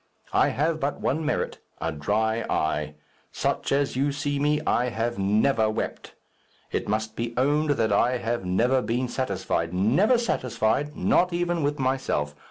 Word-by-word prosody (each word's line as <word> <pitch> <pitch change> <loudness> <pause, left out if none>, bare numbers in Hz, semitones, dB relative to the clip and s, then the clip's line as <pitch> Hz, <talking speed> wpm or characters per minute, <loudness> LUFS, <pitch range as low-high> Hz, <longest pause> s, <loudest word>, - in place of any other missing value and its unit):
I - - +4
have 155 +3 0
but 140 0 -2
one 155 +4 0
merit 155 - -2 0.2
a 80 0 -2
dry 110 +9 0
eye. 75 -1 -1 0.4
Such - - -1
as 140 -1 +1
you 140 +2 +1
see 145 0 -2
me, 150 +1 +2
I 125 +1 +2
have 115 -1 -2
never 110 +3 +2
wept. 110 - -4 0.6
It - - -2
must 110 +1 -1
be 115 0 -3
owned 145 +4 +2
that 110 -2 +2
I 125 +5 +3
have 120 -2 -2
never 120 +9 +2
been 125 +2 -1
satisfied 95 -8 -2
never 140 - +3
satisfied 145 - 0
not 180 0 +2
even 175 -1 0
with 145 0 0
myself. 130 - -1
125 Hz, 160 wpm, -25 LUFS, 110-145 Hz, 0.6 s, I